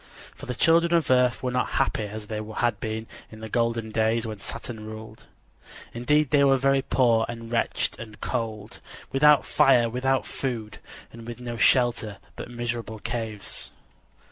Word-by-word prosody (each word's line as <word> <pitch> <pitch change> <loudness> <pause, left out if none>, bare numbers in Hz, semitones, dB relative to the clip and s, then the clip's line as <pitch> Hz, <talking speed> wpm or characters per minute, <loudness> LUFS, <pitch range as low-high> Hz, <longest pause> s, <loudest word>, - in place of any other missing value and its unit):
For - - -11
the 125 - -3
children 170 +4 +4
of 160 -6 +2
earth 125 -1 +3
were 125 - 0
not 125 0 0
happy 110 - +1
as 105 +1 -7
they 105 0 -4
had 120 -4 0
been 110 0 -4 0.3
in 110 0 -11
the 110 - -6
golden 115 -1 0
days 110 +1 +1
when 110 -2 -6
Saturn 110 +2 -7
ruled. 110 0 -10 0.7
Indeed, 145 +4 +2
they 145 -2 +5
were 135 -1 +5
very 135 +1 +2
poor 120 -4 +3
and 115 -1 -7
wretched 115 - -1
and 110 -2 -10
cold, 110 -3 -4 0.3
without 150 +1 +5
fire, 120 -4 +4
without 130 +2 0
food, 115 -6 -4 0.3
and 115 0 -11
with 120 0 -7
no 120 -1 -5
shelter 115 -4 +2 0.2
but - - -7
miserable 120 -2 -4
caves. 110 -2 -4
115 Hz, 165 wpm, -26 LUFS, 110-125 Hz, 0.7 s, they